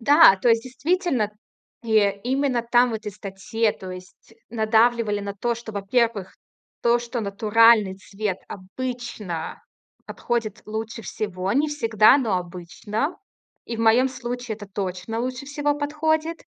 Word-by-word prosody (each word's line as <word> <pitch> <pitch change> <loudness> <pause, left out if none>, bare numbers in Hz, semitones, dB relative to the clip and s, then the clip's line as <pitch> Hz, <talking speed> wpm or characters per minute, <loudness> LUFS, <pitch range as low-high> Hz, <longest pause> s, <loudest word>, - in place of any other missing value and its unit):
Да, 285 -4 +7
то 215 +6 +1
есть 230 0 +4
действительно, 270 - -1 0.5
э, 205 -3 +2
именно 260 -1 0
там, 240 +1 +3
в - - -3
этой 215 -2 -5
статье, 210 +3 -2
то 185 -1 -9
есть 185 +4 -12 0.2
надавливали 220 -1 +2
на 200 0 -5
то, 235 +4 -1
что, 230 -2 -9
во-первых, 205 0 0 0.5
то, 235 0 +4
что 240 0 -4
натуральный 215 0 +4
цвет 200 -1 -4
обычно 210 -4 -6 0.4
подходит 225 -3 -3
лучше 220 +1 -5
всего. 195 -2 -3
Не 295 +3 +2
всегда, 230 -4 +4
но 220 -8 0
обычно. 185 - -4 0.5
И 230 - -5
в 225 - -4
моём 235 +4 +4
случае 245 -2 -5
это 205 -2 -10
точно 190 +2 -4
лучше 255 +2 -4
всего 290 0 0
подходит. 315 +2 -1
225 Hz, 140 wpm, -23 LUFS, 205-250 Hz, 0.5 s, Да